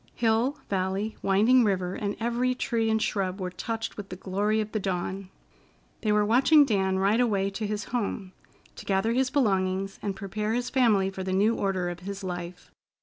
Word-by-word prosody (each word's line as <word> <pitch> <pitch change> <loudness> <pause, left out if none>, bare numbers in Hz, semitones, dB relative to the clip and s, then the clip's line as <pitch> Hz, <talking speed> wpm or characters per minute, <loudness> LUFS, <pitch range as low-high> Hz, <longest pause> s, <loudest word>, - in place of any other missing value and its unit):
Hill, 235 +5 +1
valley, 195 +3 -1
winding 220 +6 +4
river, 185 -4 0
and 205 0 -3
every 240 +2 0
tree 230 -3 0
and 220 0 +2
shrub 195 -3 -1
were 180 -1 -3
touched 225 +4 -4
with 205 -2 -7
the 185 - -6
glory 200 +3 0
of 215 0 -3
the 215 - -1
dawn. 190 0 -3 0.7
They 215 - +1
were 210 0 +3
watching 275 +7 +5
Dan 190 -5 +1
ride 200 +4 +2
away 200 -5 +1
to 210 +2 -3
his 205 -1 -3
home, 200 -5 -2 0.4
to - - -9
gather 195 +4 +1
his 260 +1 +1
belongings, 195 -7 0
and 200 -2 -3
prepare 210 +2 -3
his 245 +1 -2
family 210 -7 +3
for 190 - -6
the 185 0 -2
new 205 +4 +3
order 190 -3 -1
of 175 0 -5
his 200 +2 -7
life. 180 -1 -6
205 Hz, 190 wpm, -27 LUFS, 190-225 Hz, 0.7 s, watching